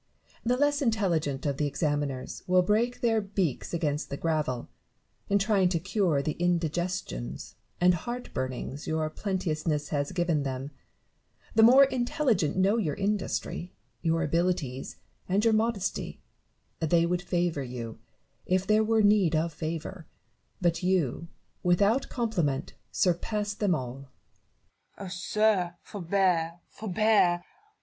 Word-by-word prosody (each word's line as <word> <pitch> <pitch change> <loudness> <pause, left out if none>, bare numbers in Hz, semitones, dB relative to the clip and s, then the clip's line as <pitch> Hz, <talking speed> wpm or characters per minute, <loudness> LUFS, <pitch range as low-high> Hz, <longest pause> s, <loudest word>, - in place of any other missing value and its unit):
The 245 +2 +1
less 290 +1 +2
intelligent 175 - 0
of 140 -2 0
the 150 - +1
examiners 145 -3 -2
will 180 0 +4
break 225 +6 +1
their 225 -2 +2
beaks 195 -8 -2
against 150 -3 -1
the 140 - -4
gravel, 150 -7 -1 0.6
in 200 - +4
trying 195 -2 +3
to 170 -2 0
cure 180 -5 +1
the 155 - 0
indigestions 175 - -2 0.3
and 180 +1 +5
heart 240 +9 -5
burnings 130 +2 -4
your 160 0 0
plenteousness 155 -6 -2
has 145 -1 -1
given 175 -4 +1
them; 135 +1 -4 0.8
the 220 - +5
more 250 +5 +8
intelligent 245 - +1
know 195 +4 +3
your 160 -11 0
industry, 200 -3 -2 0.3
your 165 0 +1
abilities, 160 -5 -1 0.3
and 200 +4 +2
your 225 - +5
modesty: 215 -3 -1 0.6
they 165 +1 +3
would 175 +1 0
favour 175 -4 0
you, 120 -3 -6 0.5
if 185 +1 +1
there 215 +1 +4
were 220 0 +3
need 205 -6 +4
of 160 +1 0
favour, 165 +2 -5 0.5
but 175 -1 +1
you, 175 -4 0 0.3
without 200 +8 +2
compliment, 180 - -1 0.2
surpass 205 +3 0
them 205 -4 +1
all. 125 -3 -5 1.0
Nev^ton. 200 - -7
Oh, - - -6
sir! 190 -1 +1
forbear, 175 -3 0
forbear 205 -4 +2
175 Hz, 130 wpm, -28 LUFS, 155-205 Hz, 1.0 s, more